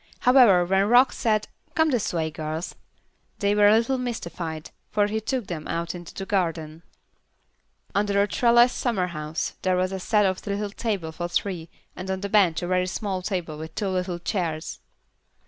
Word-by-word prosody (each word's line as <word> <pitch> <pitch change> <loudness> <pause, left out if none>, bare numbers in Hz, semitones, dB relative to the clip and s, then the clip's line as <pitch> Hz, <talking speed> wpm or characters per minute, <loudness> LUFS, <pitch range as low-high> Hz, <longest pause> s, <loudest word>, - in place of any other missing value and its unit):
However, 245 -9 +6
when 195 +2 +2
Rock 245 +2 +6
said, 215 -3 0 0.3
"Come 320 -1 +3
this 240 -6 0
way, 160 -2 -1
girls," 155 +2 -4 0.6
they 200 -1 +1
were 205 0 +5
a 210 - +7
little 255 +3 0
mystified, 170 -10 -5 0.2
for 205 -1 +2
he 215 +1 -2
took 250 +1 -2
them 165 -4 -6
out 170 0 -2
into 175 -2 -9
the 195 - -5
garden. 165 -5 -2 1.1
Under 200 0 +1
a 200 - +3
trellised 240 +2 +4
summerhouse 170 -9 -2
there 185 -1 +1
was 185 +1 0
set 210 +1 +2
a 190 +2 -2
little 200 0 -2
table 200 -7 -3
for 175 +2 -4
three, 175 -2 -2 0.3
and 185 +1 -7
on 190 0 -2
the 200 - -3
bench 190 -6 +3
a - - -2
very 180 0 +1
small 190 0 -3
table 180 -5 -3
with 160 +1 -8
two 200 - -1
little 180 -1 -2
chairs. 170 -3 -3
190 Hz, 175 wpm, -25 LUFS, 170-210 Hz, 1.1 s, a